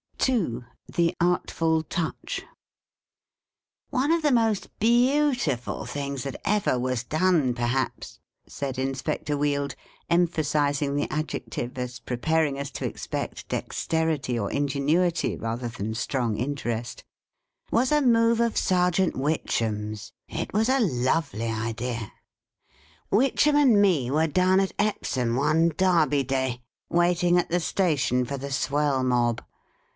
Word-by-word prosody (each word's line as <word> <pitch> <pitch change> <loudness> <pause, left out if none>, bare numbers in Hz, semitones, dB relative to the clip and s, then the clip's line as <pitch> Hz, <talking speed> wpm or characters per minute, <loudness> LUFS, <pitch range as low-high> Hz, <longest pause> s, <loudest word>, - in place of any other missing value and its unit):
II. 175 - 0 0.3
THE 170 +1 +1
ARTFUL 165 -2 +1
TOUCH. 165 0 -4 0.7
" - - -67 0.7
One 280 +2 +1
of 335 0 +2
the 295 -2 +2
most 225 -5 +1
beautiful 245 - +2
things 140 -2 -4
that 135 - -5
ever 205 -11 +1
was 125 -1 -1
done, 155 -2 +2
perhaps," 120 +2 -2 0.3
said 135 -2 -5
Inspector 135 +3 -2
Wield, 145 -1 -1 0.3
em 175 +1 +4
phasising 145 -3 0
the. 145 - -1
adjective, 125 -5 -4
as 125 -1 -4
preparing 140 +5 0
us 140 0 -4
to - - -5
expect - - -5
dexterity 160 -6 -1
or 100 -2 -2
ingenuity 145 +5 +1
rather 115 +2 -3
than 110 -1 -4
strong 120 -1 -1
interest, 120 -3 -3 0.7
"was 250 +4 +2
a 300 0 +4
move 230 -2 +4
of 235 -1 +1
Serjeant 180 0 +2
Witchem's. 110 -7 -2
It - - -5
was 220 +4 +2
a 270 +1 +3
lovely 130 - 0
idea! 115 0 -3 0.5
" 75 +2 -32
Witchem 270 +7 +3
and 265 -8 +5
me 165 -11 +3
were 155 +4 +2
down 185 +4 +3
at 195 -1 0
Epsom 130 - 0
one 155 +5 +3
Derby 165 -7 +3
Day, 130 -2 -1 0.3
waiting 175 0 +3
at 175 - +1
the 175 - +1
station 145 -8 +1
for 140 +2 -4
the 140 +1 -6
Swell 140 0 +1
Mob. 120 -2 +1
145 Hz, 130 wpm, -26 LUFS, 125-180 Hz, 0.7 s, and